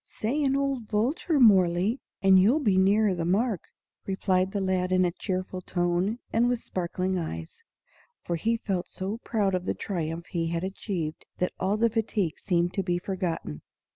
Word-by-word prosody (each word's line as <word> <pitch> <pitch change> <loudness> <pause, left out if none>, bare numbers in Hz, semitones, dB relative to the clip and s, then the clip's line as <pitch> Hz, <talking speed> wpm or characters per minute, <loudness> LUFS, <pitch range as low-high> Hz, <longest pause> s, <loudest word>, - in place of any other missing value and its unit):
"Say 270 +8 -2
an 270 -1 +2
old 275 -5 -1
vulture, 270 +8 +1
Mohrle, 195 0 +4 0.2
and 190 -1 +7
you'll 220 +10 +5
be 210 -10 +2
nearer 200 +2 +4
the 170 -2 -2
mark," 200 +4 0 0.4
replied 190 -1 +1
the 200 - -1
lad 185 -1 0
in 185 0 +4
a 175 - +1
cheerful 185 0 -4
tone 175 +4 0 0.2
and 235 +2 +3
with 245 -1 -1
sparkling 185 +1 -2
eyes; 80 - -6 0.6
for 170 - -2
he 230 +8 0
felt 190 -5 -2
so 195 +4 -4
proud 205 -5 0
of 180 0 -1
the - - -1
triumph 170 -3 -3
he 165 -2 -1
had 170 +1 -2
achieved 185 -4 -4
that 180 - -1
all 195 +3 +1
fatigue 220 -6 0
seemed 175 -1 0
to 195 - 0
be 175 -2 0
forgotten. 175 - -3
190 Hz, 170 wpm, -27 LUFS, 175-220 Hz, 0.6 s, and